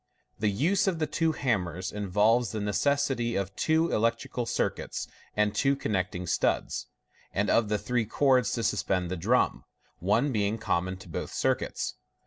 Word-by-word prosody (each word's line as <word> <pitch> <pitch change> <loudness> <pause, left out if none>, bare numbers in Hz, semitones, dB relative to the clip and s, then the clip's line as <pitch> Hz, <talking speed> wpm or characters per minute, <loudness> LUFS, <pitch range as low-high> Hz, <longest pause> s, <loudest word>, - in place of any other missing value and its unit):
The 105 0 +2
use 180 - +2
of 185 -3 +1
the 160 - 0
twe 160 +2 0
hammers 95 - -1
involves 105 +3 +2
the 110 - -2
necessity 120 +4 +1
of 100 0 -2
two 160 +1 +2
electrical 115 +2 0
circuits - - -2 0.3
and 105 -1 +2
two 135 0 +2
connecting 90 -7 -2
studs, - - 0 0.4
and 100 +1 +1
of 115 -3 +3
three 120 0 0
cords 130 -3 +3
to 115 - -1
suspend 90 -5 0
the - - 0
drum 110 +9 +1 0.4
(one 110 - +2
being 105 -1 0
common 95 -3 -1
to 95 - -13
both 80 - -5
circuits). - - -1
110 Hz, 150 wpm, -28 LUFS, 95-130 Hz, 0.4 s, of